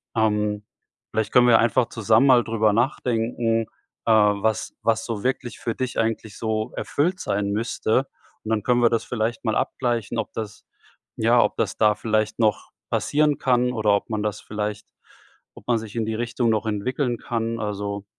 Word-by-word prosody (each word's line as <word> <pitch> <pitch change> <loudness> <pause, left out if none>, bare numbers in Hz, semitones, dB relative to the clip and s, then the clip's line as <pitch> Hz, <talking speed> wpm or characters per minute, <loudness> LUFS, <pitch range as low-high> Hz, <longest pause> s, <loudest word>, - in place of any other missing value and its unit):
Ähm, 105 -1 0 0.5
vielleicht 110 -1 -1
können 125 0 +5
wir 115 -2 +6
einfach 120 +1 +2
zusammen 110 +2 +3
mal 125 -3 +6
drüber 110 -2 +1
nachdenken, 115 -2 0 0.4
äh, 115 - +4
was 105 0 +2
was 115 0 +1
so 110 -4 -4
wirklich 125 -1 -2
für 115 - -2
dich 130 -1 -3
eigentlich 110 -2 -2
so 110 -1 -2
erfüllt 180 +5 -1
sein 100 0 -1
müsste. 115 +4 0 0.4
Und 110 - -6
dann 110 -2 0
können 120 +1 +2
wir 120 - +5
das 115 -1 -1
vielleicht 115 0 -2
mal 110 - +1
abgleichen, 120 -3 -1
ob 110 - -3
das 110 -2 -7 0.5
ja, - - +4
ob - - +1
das - - -1
da 105 -1 +4
vielleicht 110 0 -1
noch 110 -2 +1 0.2
passieren 150 -1 +2
kann 125 -1 +2
oder 110 -4 +2
ob 100 - -3
man 110 -1 -2
das 105 -1 -3
vielleicht 105 0 -4 0.7
ob - - -15
man 120 - +3
sich 110 -1 -9
in 115 -2 -1
die 110 - -2
Richtung 120 +1 -1
noch 110 0 +1
entwickeln 120 +4 -1
kann. 115 -1 -3
Also, 100 -1 -4
110 Hz, 180 wpm, -23 LUFS, 105-120 Hz, 0.7 s, wir